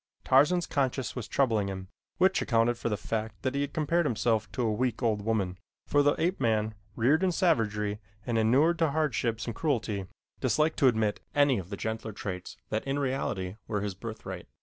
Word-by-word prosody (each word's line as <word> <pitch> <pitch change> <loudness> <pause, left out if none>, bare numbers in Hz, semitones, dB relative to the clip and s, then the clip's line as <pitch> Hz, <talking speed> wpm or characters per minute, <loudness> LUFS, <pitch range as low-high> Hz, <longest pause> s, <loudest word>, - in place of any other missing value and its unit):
Tarzan's 150 +7 +4
conscience 130 -3 -1
was 125 -4 -4
troubling 115 -7 +1
him, 95 -1 -5 0.3
which 190 +1 +3
accounted 115 -1 +2
for 120 - -3
the 105 - -1
fact 110 +2 -4
that 130 0 0
he 140 +1 0
compared 160 +2 +1
himself 110 -2 0
to 125 - -1
a 110 -2 +1
weak, 125 +1 -1
old 110 -3 +1
woman, 100 -4 -1 0.3
for 145 - +3
the 145 0 +3
ape 175 +4 0
man, 110 -1 +1 0.2
reared 140 +9 +3
in 190 -1 +3
savagery 105 - +1 0.3
and 120 - -1
inured 135 +10 +3
to 165 -2 +3
hardships 130 -7 0
and 115 - -3
cruelty, 110 - -1 0.3
disliked 155 +1 +1
to 135 - +6
admit 110 -4 +2 0.2
any 145 -5 +4
of 90 -1 -8
the 100 - -5
gentler 110 0 -4
traits 90 -3 -6
that 110 - -1
in 135 +1 0
reality 130 -9 -2
were 105 -2 -1
his 100 -1 -2
birthright. 110 +4 -7
115 Hz, 190 wpm, -29 LUFS, 105-145 Hz, 0.3 s, to